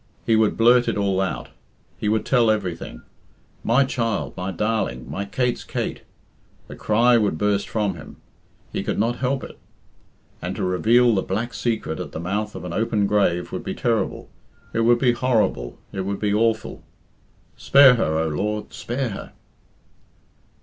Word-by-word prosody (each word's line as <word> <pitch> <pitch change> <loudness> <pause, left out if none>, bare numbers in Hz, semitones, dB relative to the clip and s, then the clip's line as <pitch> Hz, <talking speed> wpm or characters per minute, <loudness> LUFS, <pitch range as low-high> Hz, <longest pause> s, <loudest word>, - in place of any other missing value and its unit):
He 115 - +3
would 110 -1 +2
blurt 120 +1 +5
it 115 - 0
all 100 -2 +1
out; 95 - -3 0.5
he 105 - -2
would 110 0 +1
tell 120 -4 +3
everything. 90 - -3 0.6
"My 120 +5 +4
child! 115 -5 -2
my 90 +1 -4
darling! 95 - -2
my 100 - -4
Kate's 125 +4 -1
Kate!" - - -4 0.7
The - - -9
cry 115 +3 +3
would 100 -7 0
burst 100 +2 0
from 105 -3 0
him. 80 -3 -11 0.6
He - - -1
could - - -2
not 115 +3 0
help 135 +1 -1
it. - - -10 0.8
And - - -4
to - - -3
reveal 115 +6 +3
the 95 - +1
black 115 +6 -3
secret 115 -8 -2
at - - -6
the - - -4
mouth 105 +5 -3
of - - -7
an 90 - -5
open 110 0 +1
grave 100 -4 +1
would - - -5
be - - -4
terrible, 115 -4 -1 0.5
it - - 0
would 120 +1 +4
be 125 0 +3
horrible, 110 - 0
it 95 - -3
would 100 +1 -3
be 105 -1 0
awful, 110 0 0 0.7
"Spare 140 -2 +7
her, 80 -10 0
O 80 0 0
Lord, 105 +7 -3
spare 125 +1 -3
her!" 100 - -8
110 Hz, 170 wpm, -23 LUFS, 95-120 Hz, 0.8 s, Spare